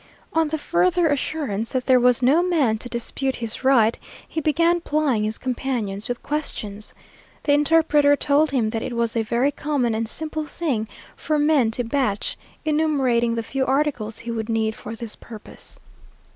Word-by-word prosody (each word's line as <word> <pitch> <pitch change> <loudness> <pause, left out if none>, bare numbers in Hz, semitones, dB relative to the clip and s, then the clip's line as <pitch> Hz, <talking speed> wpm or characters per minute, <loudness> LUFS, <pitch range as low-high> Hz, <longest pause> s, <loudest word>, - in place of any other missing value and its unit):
On 325 -1 +2
the 315 +1 -2
further 345 +2 +2
assurance 275 -7 -2
that 255 -1 -1
there 255 -1 +5
was 250 +1 +3
no 285 +7 +5
man 300 -12 +1
to 245 - -7
dispute 260 +3 -3
his 230 +2 -5
right, 235 -4 +4 0.3
he 320 - -3
began 335 +3 +2
plying 295 -9 +1
his 215 +1 -3
companions 240 -5 -3
with 245 - -4
questions. 215 -9 -4 0.5
The 285 - +3
interpreter 295 -1 +4
told 290 +2 +2
him 235 -5 0
that 225 -1 -2
it 250 0 -4
was 235 0 -1
a 230 - +2
very 235 +5 +1
common 285 -5 -1
and 220 0 -2
simple 310 +1 -4
thing 265 -12 -2 0.3
for 305 0 -1
men 295 -5 +3
to 245 - 0
batch, 230 -4 -1 0.3
enumerating 270 -7 +2
the 230 - -2
few 265 +3 -2
articles 265 -5 0
he 235 - -6
would 225 -1 -4
need 220 -1 0
for 220 +1 -8
this 230 -2 -7
purpose. 220 -3 -11
260 Hz, 170 wpm, -23 LUFS, 230-300 Hz, 0.5 s, there